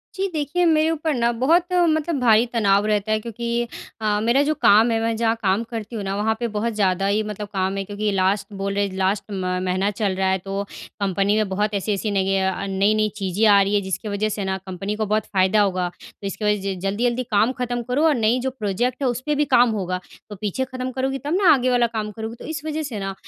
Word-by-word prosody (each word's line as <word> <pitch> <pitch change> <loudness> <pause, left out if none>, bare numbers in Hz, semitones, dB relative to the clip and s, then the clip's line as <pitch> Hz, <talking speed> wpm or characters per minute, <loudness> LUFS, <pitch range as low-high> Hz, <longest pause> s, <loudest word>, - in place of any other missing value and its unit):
जी, 390 +1 -1
देखिए 315 +4 0
मेरे 315 -1 +3
ऊपर 315 -1 -1
ना 235 -1 +1
बहुत 335 +9 +2
मतलब 320 -3 +2
भारी 230 -1 +5
तनाव 200 -2 +3
रहता 210 0 0
है 215 - +2
क्योंकि 235 +1 -3 0.3
अ, 210 -1 +1
मेरा 240 +5 +3
जो 305 +2 +1
काम 220 +3 +6
है 225 - +1
मैं 225 0 0
जहाँ 225 0 +1
काम 200 +3 +1
करती 230 0 -7
हूँ 205 - -3
ना, 195 0 -2
वहाँ 220 +2 0
पे 235 - -1
बहुत 220 +1 -2
ज़्यादा 195 -2 +1
ही 210 +2 +2
मतलब 210 0 -6
काम 190 0 0
है। 195 - -1
क्योंकि 205 +1 -2
लास्ट 195 +1 +1
बोल 195 0 -3
रहे 200 0 +1
हैं, 190 - -9
लास्ट 190 +1 +1
म 185 -2 -2
महीना 185 +2 +1
चल 200 -2 -1
रहा 190 0 0
है, 190 - +2
तो 195 +2 -4 0.4
कंपनी 200 +1 +1
में 215 -2 +1
बहुत 205 +2 -1
ऐसी-ऐसी 205 +1 -1
नई 195 -1 +1
य - - +2
अ, 195 - -4
नई-नई 210 +3 +2
चीज़ें 195 +2 0
आ 200 -1 +6
रही 200 +1 +1
हैं 205 - +2
जिसकी 190 +3 -4
वजह 210 +2 -1
से 205 -1 -3
ना 190 0 -1
कंपनी 190 +2 -5
को 215 0 -1
बहुत 215 +1 0
फ़ायदा 190 +2 +2
होगा। 185 -3 +1
तो 195 +2 -11
इसकी 210 +2 -4
वज़ह 210 -1 +1
से 195 -1 -2
ज 180 - -9
जल्दी-जल्दी 235 +6 0
काम 215 +4 +3
खत्म 245 -1 -2
करो 275 +5 +1
और 300 - +3
नई 230 +2 +2
जो 265 +1 -1
प्रोजेक्ट 235 +6 -1
है 265 - +2
उस 240 +1 -3
पे 300 -1 +1
भी 295 +1 +2
काम 245 -1 +6
होगा। 185 -3 -2 0.3
तो 205 - -7
पीछे 210 +6 -2
खत्म 255 0 -5
करोगी 265 +1 -2
तब 300 - -1
ना 370 - +7
आगे 255 -2 +1
वाला 245 -1 +3
काम 215 -2 -4
करोगी। 220 +2 -6
तो - - -9
इस 310 -2 -4
वज़ह 310 0 -2
से 235 -8 -5
ना 195 0 -3
215 Hz, 255 wpm, -22 LUFS, 195-245 Hz, 0.4 s, ना